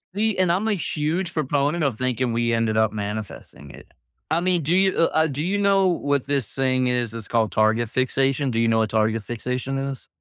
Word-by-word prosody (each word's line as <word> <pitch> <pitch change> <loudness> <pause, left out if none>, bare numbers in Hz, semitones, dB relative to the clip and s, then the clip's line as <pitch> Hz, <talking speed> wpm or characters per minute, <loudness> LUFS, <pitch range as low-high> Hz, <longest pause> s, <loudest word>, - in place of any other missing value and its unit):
See, 215 -1 0
and 180 -2 +3
I'm 200 +5 0
a 215 - +2
huge 165 0 -2
proponent 150 +2 0
of 130 -6 0
thinking 125 -1 -1
we 120 0 0
ended 115 -1 0
up 110 0 +3
manifesting 105 -8 -6
it. - - -14 0.4
I 165 - +3
mean, 180 -3 +1
do 165 +5 +1
you 190 0 +3
uh, 160 -1 +3
do 145 +1 -4
you 195 +3 0
know 195 -1 +3
what 145 -6 0
this 140 -7 -1
thing 130 -1 +1
is? 120 -2 -1
It's 115 -3 -7
called 110 -4 +1
target 110 +1 +2
fixation. 135 +2 0
Do 115 - -1
you 115 - +2
know 110 0 +2
what 110 - +1
target 110 0 0
fixation 125 +4 -3
is? 135 -1 -5
130 Hz, 210 wpm, -23 LUFS, 115-160 Hz, 0.4 s, and